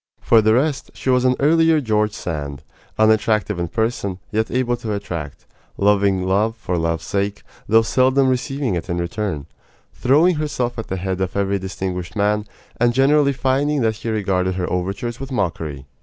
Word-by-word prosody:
For 115 -1 +4
the 110 +1 +3
rest, 140 +2 0
she 130 - -1
was 125 0 +3
an 130 0 +4
earlier 160 +2 +4
George 105 -5 0
Sand 75 -6 -5 0.3
unattractive 110 -2 +2
in 85 - -1
person, 110 -2 -2
yet 110 +1 0
able 125 -1 0
to 110 -2 -4
attract; 85 -8 -6 0.3
loving 100 -2 +2
love 105 +4 +1
for 90 -5 -3
love's 80 -1 -1
sake, 100 +1 -2 0.3
though 115 +1 +5
seldom 130 +3 +3
receiving 130 -1 -1
it 85 -2 -4
in 85 - -1
return; 85 -3 -3 0.5
throwing 155 +7 +3
herself 140 -6 -2
at 115 - -5
the 95 - -3
head 95 0 -3
of 95 +1 -2
every 100 0 0
distinguished 90 -2 -5
man, 105 0 +1 0.3
and 120 0 +2
generally 140 +2 +4
finding 140 +2 0
that 110 -2 +1
he 115 - -5
regarded 95 -4 0
her 90 -1 -2
overtures 100 +6 -3
with 135 0 -7
mockery. 80 - -3
105 Hz, 170 wpm, -20 LUFS, 95-130 Hz, 0.5 s, though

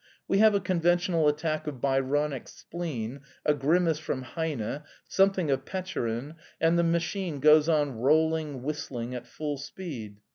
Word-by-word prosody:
We 195 - +2
have 215 -1 +6
a - - +3
conventional 175 -3 +2
attack 155 +1 0
of 140 -4 -4
Byronic 135 +1 0
spleen, 140 -8 -5 0.3
a 150 - +4
grimace 160 +3 +2
from 130 -4 -3
Heine, 140 -3 -3 0.3
something 195 -5 +2
of 135 0 0
Petchorin 150 -6 -3 0.2
and 165 +1 +3
the - - +4
machine 170 -1 -1
goes 155 +2 +6
on 150 -3 +2
rolling, 155 0 +2
whistling, 125 -4 -4
at 125 -1 -6
full 145 +1 -4
speed. 140 - -7
150 Hz, 145 wpm, -28 LUFS, 135-170 Hz, 0.3 s, have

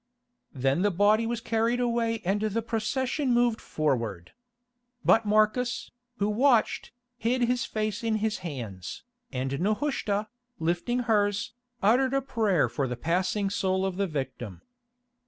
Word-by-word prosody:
Then 135 +5 +1
the 205 - +3
body 205 +4 +3
was 235 -1 -2
carried 230 +2 +1
away 230 -2 0
and 200 +3 +1
the 215 +1 0
procession 255 +5 -1
moved 240 -2 +2
forward. 115 - -2 0.7
But 225 -1 +5
Marcus, 215 +4 +2 0.3
who 205 - +1
watched, 235 +2 +2 0.3
hid 240 +3 +1
his 245 +1 +1
face 215 0 -2
in 225 -1 +1
his 215 0 -1
hands, 110 - -6 0.3
and 135 0 -2
Nehushta, 210 - 0 0.3
lifting 175 +10 0
hers, 205 -1 +1 0.3
uttered 255 +6 +4
a 275 - +2
prayer 215 - +2
for 140 -2 -2
the 125 -1 -4
passing 185 - 0
soul 190 -1 0
of 190 -1 -2
the 200 0 +1
victim. 130 - -5
210 Hz, 135 wpm, -28 LUFS, 170-230 Hz, 0.7 s, But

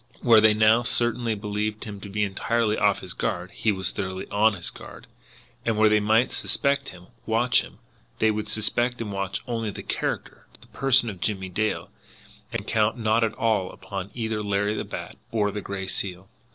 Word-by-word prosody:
Where 115 -3 +7
they 110 -1 +6
now 110 +2 +5
certainly 120 -1 +1
believed 105 +1 -3
him 105 -2 -7
to 100 - -9
be 105 +2 0
entirely 110 +2 0
off 100 -2 +2
his 95 -1 -5
guard, 90 +1 -3
he 110 - 0
was 95 -2 -2
thoroughly 95 -1 -4
on 105 +1 +4
his 85 - -2
guard; - - -12 0.6
and 115 -2 0
where 110 0 +5
they 105 0 +4
might 110 +4 +3
suspect 140 0 +1
him, 90 -1 -13 0.2
watch 120 +2 +3
him, - - -12 0.4
they 110 - +3
would 105 0 -3
suspect 120 +3 +1
and 110 -3 -4
watch 100 +1 -3
only 115 -3 -2
the 100 - -7
character, - - -3
the - - -18
person 130 -3 +3
of 95 -5 -6
Jimmie 95 -3 -1
Dale, 105 +4 -2 0.6
and - - -3
count 110 +2 +1
not 110 0 +2
at 110 -1 0
all 110 -5 +1
upon 100 -1 -6
either 110 -2 -2
Larry 105 0 0
the - - -2
Bat - - -7
or 105 -2 +1
the 105 - -4
Gray 100 0 -5
Seal. 95 0 -3
105 Hz, 190 wpm, -25 LUFS, 100-115 Hz, 0.6 s, Where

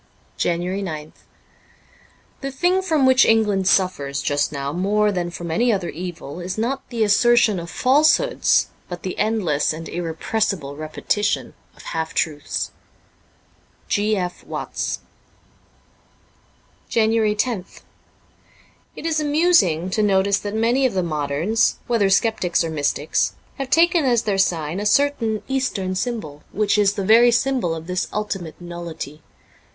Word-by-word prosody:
JANUARY 175 +3 -1
9th 155 -5 -5 1.3
THE 275 - -3
thing 355 +8 +1
from 315 -7 +1
which 260 0 +6
England 210 -4 +2
suffers 140 -9 +1
just 145 +1 0
now 140 -1 -4
more 205 +4 +1
than 175 -3 -2
from 170 -1 -6
any 235 +9 +2
other 190 -5 -1
evil 170 -2 -7
is 180 +2 -5
not 250 +5 -2
the 235 -3 0
assertion 215 -1 +4
of 170 0 -7
falsehoods, 305 - +3 0.2
but 175 -1 -7
the 185 - -4
endless 200 -9 +1
and 165 +1 -7
irrepressible 170 -2 -2
repetition 155 +7 -2 0.2
of - - -15
half 160 0 -4
truths. 150 -2 -2 0.6
' - - -36
G. 210 0 +1
F. 180 -1 -4
Watts: - - -4 1.9
JANUARY 220 -1 +2
loth 220 -8 -6 1.1
IT - - -8
is 320 -1 +1
amusing 290 - +2
to 215 - +1
notice 200 -1 +2
that 205 +1 -5
many 240 +4 +2
of - - -5
the 185 - +1
moderns, 155 +6 0
whether 225 -5 +2
sceptics 195 -4 +2
or 165 - -3
mystics, 145 0 0 0.3
have 270 -1 -3
taken 335 +2 +4
as 240 -3 +2
their 200 -3 0
sign 165 -2 0
a 205 - -3
certain 230 -3 +1
eastern 250 -8 -1
symbol, 185 - -4
which 210 +1 +1
is 200 -1 +3
the 195 - -3
very 230 +4 +6
symbol 240 -7 +1
of 160 0 -8
this 180 +2 -2
ultimate 195 -6 -4
nullity. 170 -4 -7
200 Hz, 140 wpm, -21 LUFS, 170-230 Hz, 1.9 s, which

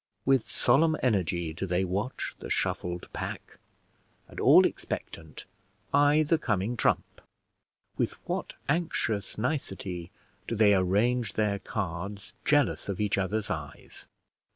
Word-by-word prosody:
With 135 -3 +3
solemn 155 +6 +3
energy 90 -8 +1
do 90 +4 -4
they 90 +1 +1
watch 100 +7 -3
the - - -7
shuffled 90 0 -1
pack, - - -6 0.7
and, - - -10
all - - +7
expectant, 80 -3 -5 0.5
eye 145 +2 +5
the 155 +1 +2
coming 105 -2 0
trump. - - 0 0.8
With - - 0
what - - -3
anxious 125 - -1
nicety 95 - -3 0.4
do 115 - -2
they 105 -2 +5
arrange 105 +4 +2
their 105 -2 0
cards, 100 -1 -5
jealous 145 -7 +2
of 95 - -3
each 105 -2 +1
other's 105 +2 -1
eyes! 75 -5 -6
105 Hz, 125 wpm, -28 LUFS, 95-125 Hz, 0.8 s, all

